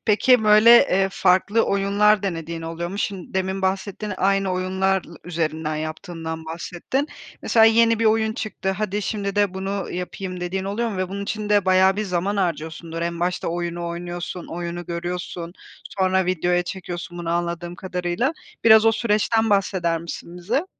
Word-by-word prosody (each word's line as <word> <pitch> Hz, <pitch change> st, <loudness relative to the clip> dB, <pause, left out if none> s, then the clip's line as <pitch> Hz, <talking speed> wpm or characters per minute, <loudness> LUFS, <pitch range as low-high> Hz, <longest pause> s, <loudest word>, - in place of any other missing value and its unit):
Peki 220 Hz, +2 st, +4 dB
böyle, 215 Hz, +2 st, +7 dB, 0.2 s
eee, 195 Hz, +1 st, +3 dB
farklı 190 Hz, +5 st, +3 dB
oyunlar 200 Hz, +1 st, +3 dB
denediğin 165 Hz, -3 st, -4 dB
oluyor 165 Hz, +1 st, -4 dB
mu? 200 Hz, -, -6 dB
Şim 195 Hz, -4 st, -4 dB
demin 190 Hz, 0 st, -1 dB
bahsettin 195 Hz, +2 st, -2 dB
aynı 195 Hz, -1 st, +1 dB
oyunlar 190 Hz, +1 st, 0 dB
lı 170 Hz, -, -13 dB
üzerinden 160 Hz, -2 st, -2 dB
yaptığından 160 Hz, +1 st, -5 dB
bahsettin. 175 Hz, -, -3 dB, 0.3 s
Mesela 225 Hz, -1 st, +5 dB
yeni 230 Hz, 0 st, +5 dB
bir 230 Hz, -, 0 dB
oyun 220 Hz, 0 st, +3 dB
çıktı, 195 Hz, -3 st, -3 dB
hadi, 210 Hz, +1 st, -2 dB
şimdi 200 Hz, -1 st, -3 dB
de 200 Hz, -2 st, +2 dB
bunu 195 Hz, 0 st, -3 dB
yapayım, 180 Hz, 0 st, -5 dB
dediğin 190 Hz, +2 st, -3 dB
oluyor 225 Hz, +4 st, -1 dB
mu? 200 Hz, -, -5 dB
Ve 185 Hz, -1 st, -1 dB
bunun 200 Hz, +1 st, -5 dB
içinde 210 Hz, -1 st, 0 dB
bayağı 190 Hz, +1 st, +4 dB
bir 215 Hz, -, -1 dB
zaman 190 Hz, +2 st, -1 dB
harcıyorsundur. 165 Hz, -1 st, -3 dB
En 170 Hz, 0 st, -3 dB
başta 180 Hz, -1 st, -1 dB
oyunu 175 Hz, 0 st, -3 dB
oynuyorsun, 175 Hz, +1 st, -5 dB
oyunu 175 Hz, 0 st, -5 dB
görüyorsun, 175 Hz, 0 st, -5 dB, 0.5 s
sonra 190 Hz, -1 st, +2 dB
videoya 175 Hz, 0 st, +1 dB
çekiyorsun 175 Hz, -1 st, -6 dB
bunu 170 Hz, -1 st, -3 dB
anladığım 175 Hz, 0 st, -2 dB
kadarıyla. 180 Hz, -, -1 dB, 0.3 s
Biraz 220 Hz, -1 st, +8 dB
o 225 Hz, -, +6 dB
süreçten 220 Hz, 0 st, +1 dB
bahseder 185 Hz, -4 st, +1 dB
misin 170 Hz, +1 st, -8 dB
bize? 240 Hz, -, -1 dB
185 Hz, 160 wpm, -23 LUFS, 175-205 Hz, 0.5 s, Biraz